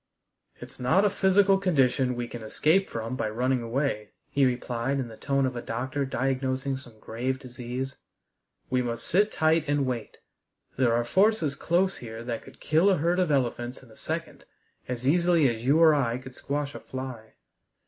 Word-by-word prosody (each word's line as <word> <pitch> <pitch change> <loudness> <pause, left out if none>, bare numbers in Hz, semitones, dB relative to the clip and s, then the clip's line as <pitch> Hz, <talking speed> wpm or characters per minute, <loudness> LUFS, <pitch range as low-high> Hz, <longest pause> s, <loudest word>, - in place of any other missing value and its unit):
"It's - - -11
not 155 +11 +3
a 205 - +3
physical 195 0 +4
condition 135 -8 +2
we 120 0 -3
can 120 - -8
escape 155 - +2
from 115 +2 -4
by 110 - -1
running 125 +3 0
away," 115 -3 -2 0.2
he 140 -2 +4
replied, 125 +2 -1
in 125 -3 -3
the 110 - -10
tone 135 +2 0
of 130 -1 -2
a 120 - -3
doctor 130 +5 -2
diagnosing 130 +1 -1
some 120 -4 -12
grave 125 +5 -3
disease; 130 +1 -6 0.7
"we 130 0 +2
must 115 -1 -3
sit 205 +4 +2
tight 160 0 +2
and 145 -1 +1
wait. 125 -3 -4 0.6
There 125 -3 +3
are 120 0 +1
forces 190 - +3
close 175 +6 +1
here 115 -1 -8
that 120 -1 -4
could - - -15
kill 160 +6 +3
a 190 - +3
herd 170 +4 +1
of 180 -3 +2
elephants 125 -2 -1
in 120 - -17
a - - -16
second - - -5 0.4
as 125 0 -3
easily 170 -1 +4
as 115 -2 -2
you 145 +3 +5
or 160 -2 +7
I 125 -5 +1
could 130 0 -10
squash 145 +2 -3
a - - -7
fly. 130 -4 -8
130 Hz, 185 wpm, -27 LUFS, 120-155 Hz, 0.7 s, or